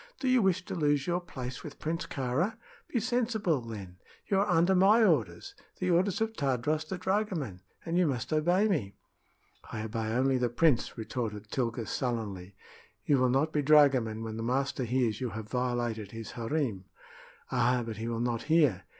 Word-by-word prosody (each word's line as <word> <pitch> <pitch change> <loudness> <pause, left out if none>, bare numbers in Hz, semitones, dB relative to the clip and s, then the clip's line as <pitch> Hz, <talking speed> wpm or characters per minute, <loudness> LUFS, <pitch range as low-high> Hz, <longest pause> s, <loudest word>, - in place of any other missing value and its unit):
"Do 265 - -2
you 255 -1 +4
wish 185 -2 +1
to - - -5
lose 145 -4 +1
your 175 0 0
place 130 -7 -7
with 150 - -9
Prince 165 +2 -3
Kāra? 145 - -1 0.3
Be 240 - -1
sensible, 220 - 0
then. 100 -6 -8 0.3
You 195 - +1
are 205 +1 +1
under 175 +3 +4
my 200 +5 +5
orders 115 - +1 0.2
the 180 -1 0
orders 185 +4 +2
of 225 0 0
Tadros 145 - 0
the 190 - -4
dragoman, 185 - -2 0.2
and 170 +2 0
you 180 - +4
must 135 +2 -2
obey 175 +7 +3
me." 120 - -1 0.8
"I 110 - -4
obey 110 0 -3
only 130 +3 +2
the 125 -1 +1
prince," 125 +1 +2
retorted 110 -2 -4
Tilga, 120 -3 -1
sullenly. 105 -8 -3 0.5
"You 140 -2 +3
will 130 0 +3
not 140 +5 +1
be 150 - +2
dragoman 135 -7 +4
when 110 -1 -5
the - - -4
master 130 +2 -1
hears 120 -2 0
you 125 - -1
have 110 -1 -6
violated 120 -4 -1
his 115 -1 -7
harem." 115 -5 -2 0.7
"Ah, 125 0 +2
but 110 -1 -6
he 110 +1 -4
will 115 -1 -2
not 120 -1 -1
hear! 140 - +3
130 Hz, 180 wpm, -30 LUFS, 115-170 Hz, 0.8 s, my